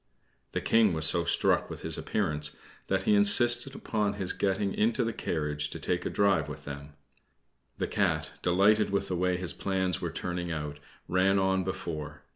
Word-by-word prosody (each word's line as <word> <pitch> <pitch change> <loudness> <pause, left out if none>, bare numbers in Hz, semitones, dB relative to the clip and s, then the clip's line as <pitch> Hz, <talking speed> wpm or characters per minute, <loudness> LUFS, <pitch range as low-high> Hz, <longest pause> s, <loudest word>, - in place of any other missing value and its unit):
The - - -1
King 110 -4 +3
was 80 0 -1
so 85 +1 +3
struck - - +2
with - - -8
his - - -3
appearance 75 0 -1 0.3
that 95 0 0
he 105 - +3
insisted 120 +6 +5
upon 105 -2 -1
his 100 -3 -2
getting 100 0 -1
into 115 +3 +1
the 115 0 -2
carriage 75 -4 -2
to - - -7
take 90 0 -1
a - - -2
drive 95 -7 +2
with 75 0 -9
them. 70 +1 -8 0.8
The - - -1
Cat, - - 0
delighted 100 +4 +3
with 100 0 -1
the 90 - -1
way 90 0 0
his 90 -2 -1
plans 95 -3 -1
were - - -2
turning 90 -1 -4
out, 75 -2 -5 0.3
ran 95 +2 +2
on 95 0 +1
before. 75 -5 -5
90 Hz, 180 wpm, -29 LUFS, 80-100 Hz, 0.8 s, insisted